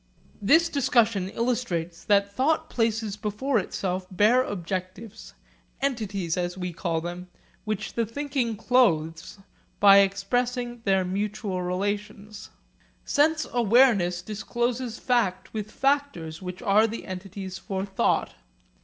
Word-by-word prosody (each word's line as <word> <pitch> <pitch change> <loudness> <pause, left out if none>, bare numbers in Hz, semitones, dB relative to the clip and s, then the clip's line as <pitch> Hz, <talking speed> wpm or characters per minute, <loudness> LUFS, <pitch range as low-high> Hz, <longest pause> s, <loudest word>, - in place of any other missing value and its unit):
This 320 +11 +5
discussion 230 - +2
illustrates 195 -9 -2
that 200 -1 +2
thought 310 +6 0
places 225 -3 0
before 215 +5 0
itself 185 -1 -3
bare 215 +7 +4
objectives, 190 0 -6 0.4
entities 205 -11 -2
as 175 0 -2
we 180 -1 -4
call 165 -1 -2
them, 175 +2 -6 0.4
which 215 -1 -3
the 230 -2 -1
thinking 265 -2 -2
clothes 165 -10 +1 0.4
by 200 -1 +8
expressing 240 +5 0
their 190 -2 +2
mutual 200 0 -2
relations. 205 +3 -4 0.6
Sense 315 +2 +2
awareness 220 -7 +4
discloses 235 +3 -3
fact 210 -7 0
with 215 -1 -4
factors 270 - -1
which 180 0 -7
are 210 +3 +4
the 225 +1 -6
entities 190 0 -7
for 190 -1 -3
thought. 195 -1 0
205 Hz, 115 wpm, -26 LUFS, 185-240 Hz, 0.6 s, by